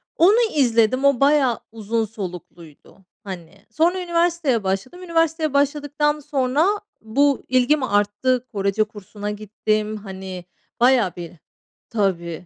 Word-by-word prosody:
Onu 395 Hz, +7 st, +5 dB, 0.2 s
izledim, 250 Hz, 0 st, +3 dB
o 280 Hz, -3 st, +4 dB
bayağı 275 Hz, -4 st, +3 dB
uzun 225 Hz, 0 st, -2 dB
solukluydu. 180 Hz, -7 st, -10 dB, 0.3 s
Hani, 190 Hz, 0 st, -10 dB
sonra 345 Hz, +7 st, +1 dB
üniversiteye 335 Hz, -, +1 dB
başladım. 195 Hz, -, -3 dB
Üniversiteye 325 Hz, -3 st, 0 dB
başladıktan 295 Hz, +1 st, +1 dB
sonra 285 Hz, +1 st, +1 dB, 0.4 s
bu 275 Hz, +5 st, +2 dB
ilgim 255 Hz, +3 st, +3 dB
arttı. 240 Hz, +4 st, +1 dB
Korece 200 Hz, +1 st, +1 dB
kursuna 210 Hz, 0 st, -7 dB
gittim. 215 Hz, +1 st, -2 dB
Hani, 190 Hz, -3 st, -8 dB, 0.4 s
bayağı 245 Hz, -7 st, +4 dB
bir 170 Hz, -2 st, -7 dB, 0.6 s
Tabii. 180 Hz, -5 st, -2 dB
230 Hz, 110 wpm, -22 LUFS, 200-290 Hz, 0.6 s, Onu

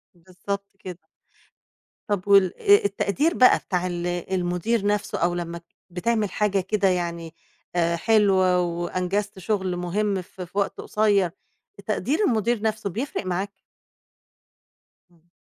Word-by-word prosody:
بالضبط 190 Hz, +3 st, -6 dB
كده. 180 Hz, -2 st, -8 dB, 1.1 s
طب 205 Hz, -2 st, -2 dB
وال 195 Hz, -3 st, +5 dB
آآ 405 Hz, -, +5 dB
التقدير 200 Hz, -, +1 dB
بقى 255 Hz, -5 st, +6 dB
بتاع 180 Hz, -1 st, -2 dB
ال 175 Hz, -1 st, -3 dB
المدير 180 Hz, +4 st, -1 dB
نَفْسه 205 Hz, 0 st, 0 dB
أو 175 Hz, +1 st, +1 dB
لمّا 170 Hz, -1 st, -4 dB
ت 170 Hz, -, -15 dB, 0.2 s
بتعمل 210 Hz, +4 st, 0 dB
حاجة 205 Hz, -2 st, +1 dB
كده 195 Hz, +1 st, +1 dB
يعني 170 Hz, -3 st, -2 dB, 0.4 s
آآ 170 Hz, -1 st, +2 dB
حلوة 190 Hz, -2 st, +3 dB
وأنجزت 180 Hz, +4 st, -2 dB
شُغل 190 Hz, -1 st, -1 dB
مهم 190 Hz, +3 st, -1 dB
ف 180 Hz, +1 st, -13 dB
في 180 Hz, +2 st, -8 dB
وقت 200 Hz, -, -1 dB
قصير، 205 Hz, -4 st, +2 dB, 0.5 s
تقدير 295 Hz, +5 st, -1 dB
المدير 230 Hz, -1 st, +1 dB
نَفْسه 220 Hz, -1 st, -1 dB
بيفرق 230 Hz, +3 st, -4 dB
معاك؟ 185 Hz, +2 st, -2 dB, 1.6 s
إمم. 170 Hz, 0 st, -30 dB
190 Hz, 130 wpm, -24 LUFS, 175-210 Hz, 1.6 s, بقى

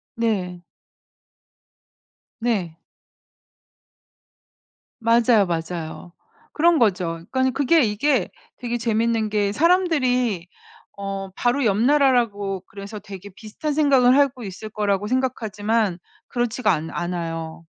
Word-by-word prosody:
네. 190 Hz, -6 st, -1 dB, 1.8 s
네. 200 Hz, -9 st, -1 dB, 2.3 s
맞아요, 230 Hz, -2 st, +4 dB
맞아요. 165 Hz, 0 st, -5 dB, 0.4 s
그런 335 Hz, +1 st, +3 dB
거죠. 180 Hz, -, 0 dB
그러니까 260 Hz, 0 st, +1 dB
그게 290 Hz, +3 st, +4 dB
이게 240 Hz, +6 st, +1 dB, 0.3 s
되게 240 Hz, -1 st, -3 dB
재밌는 225 Hz, -1 st, 0 dB
게 205 Hz, -1 st, 0 dB
사람들이 255 Hz, -, +2 dB, 0.5 s
어 195 Hz, -1 st, -5 dB
바로 245 Hz, +8 st, 0 dB
옆 205 Hz, -4 st, +2 dB
나라라고 235 Hz, -8 st, +2 dB
그래서 200 Hz, +2 st, -8 dB
되게 200 Hz, 0 st, -10 dB
비슷한 220 Hz, +9 st, -5 dB
생각을 270 Hz, -4 st, +4 dB
하고 275 Hz, -3 st, +2 dB
있을 195 Hz, +2 st, -7 dB
거라고 205 Hz, -1 st, -1 dB
생각하지만 220 Hz, -5 st, -1 dB, 0.3 s
그렇지가 245 Hz, 0 st, 0 dB
않 155 Hz, +2 st, -3 dB
않아요. 165 Hz, -2 st, -4 dB
220 Hz, 235 characters per minute, -22 LUFS, 195-250 Hz, 2.3 s, 맞아요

